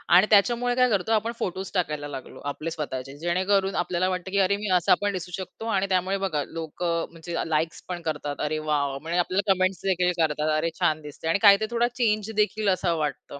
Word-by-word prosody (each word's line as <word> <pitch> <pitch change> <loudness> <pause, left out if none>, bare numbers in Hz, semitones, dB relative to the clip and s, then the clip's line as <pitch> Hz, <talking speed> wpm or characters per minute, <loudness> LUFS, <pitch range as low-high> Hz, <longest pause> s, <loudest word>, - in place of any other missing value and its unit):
आणि 190 +4 +7
त्याच्यामुळे 240 +4 +3
काय 250 0 +4
करतो? 205 +1 0
आपण 225 +1 +2
फोटोज 190 +1 -3
टाकायला 150 -5 -1
लागलो, 135 -2 -8
आपले 165 +3 -5
स्वतःचे. 140 -3 -5
जेणेकरून 190 +3 +1
आपल्याला 180 +1 0
वाटतं 185 0 -4
की 200 - +1
अरे, 195 +1 +3
मी 210 -1 -4
असा 175 - +4
पण 205 0 +1
दिसू 180 -1 -5
शकतो 190 +4 -8
आणि 195 -3 +1
त्यामुळे 185 +1 +1
बघा, 150 -6 -1
लोक 165 +1 -7
म्हणजे 170 0 -3
अ, - - 0
लाइक्स 160 +1 -1
पण 175 -1 -4
करतात. 150 -2 -3
"अरे, 155 +1 -1
वॉव!" 140 -2 0
म्हणजे 165 +4 -2
आपल्याला 195 +3 +1
कमेंट्स 185 0 0
देखील 180 -1 +2
करतात. 155 -1 +1
"अरे, 165 +2 0
छान 155 0 +1
दिसते." 150 +2 -8
आणि 165 +5 +2
काहीतरी 200 +2 +6
थोडा 235 0 +2
चेंज 215 -3 0
देखील 210 -1 +1
असं 180 -2 +1
वाटतं. 145 -1 -4
180 Hz, 205 wpm, -25 LUFS, 155-200 Hz, -, आणि